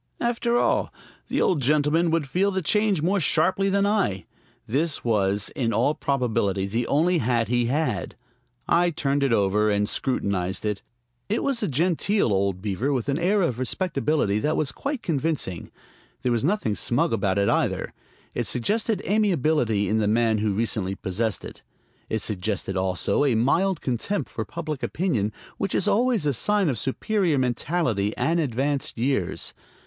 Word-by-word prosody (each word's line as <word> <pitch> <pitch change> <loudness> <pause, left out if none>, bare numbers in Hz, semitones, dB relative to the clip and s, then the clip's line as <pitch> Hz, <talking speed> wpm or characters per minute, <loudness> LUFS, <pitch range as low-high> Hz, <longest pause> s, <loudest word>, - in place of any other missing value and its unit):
After 240 0 0
all, - - +1 0.4
the - - -1
old 165 -6 +2
gentleman 150 +5 +2
would 160 -3 0
feel 185 +8 +1
the 190 -2 -2
change 210 -2 +2
more 195 +4 +2
sharply 185 +4 +2
than 200 +1 +2
I. 190 - 0 0.4
This 145 +6 -1
was, 100 -3 +1
in 115 -4 0
all 130 +6 +2
probability, 110 -10 0
the 115 +4 -2
only 170 +4 +2
hat 115 -3 0
he 120 -1 +2
had. 150 +6 -1 0.5
I 175 +1 +3
turned 145 -3 -1
it 140 -2 +2
over 105 0 +2
and 105 0 +1
scrutinized 95 -7 -1
it. 105 -1 -2 0.5
It 220 - 0
was 275 -4 0
a 210 - 0
genteel 170 - +1
old 95 -1 0
beaver, 110 +7 -1
with 130 -1 -1
an 140 +3 0
air 195 +3 +2
of 125 -8 -1
respectability 140 - 0
that 150 +7 0
was 145 -4 0
quite 275 - -4
convincing. 145 - -2 0.5
There 125 - +1
was 120 0 +1
nothing 160 - +1
smug 125 +9 0
about 100 -3 0
it, 100 0 +2
either. - - 0 0.4
It - - -2
suggested 210 - 0
amiability 155 - +1
in 110 - +1
the 105 - +1
man 110 0 +2
who 110 - 0
had 100 -2 -1
recently 105 -4 -1
possessed 100 +2 -2
it. - - -10 0.5
It 110 -2 -1
suggested 100 -1 -2
also 95 +7 +1
a 135 -5 +2
mild 165 +10 +2
contempt 135 - -2
for - - -4
public 155 -5 -5
opinion, 130 - -1 0.3
which 195 - -1
is - - +1
always 225 -2 +2
a 145 - +2
sign 205 - +2
of 125 -6 -1
superior 175 +3 0
mentality 125 - 0
and 165 +7 +1
advanced 140 -1 -1
years. 120 -6 -1
135 Hz, 165 wpm, -24 LUFS, 110-175 Hz, 0.5 s, I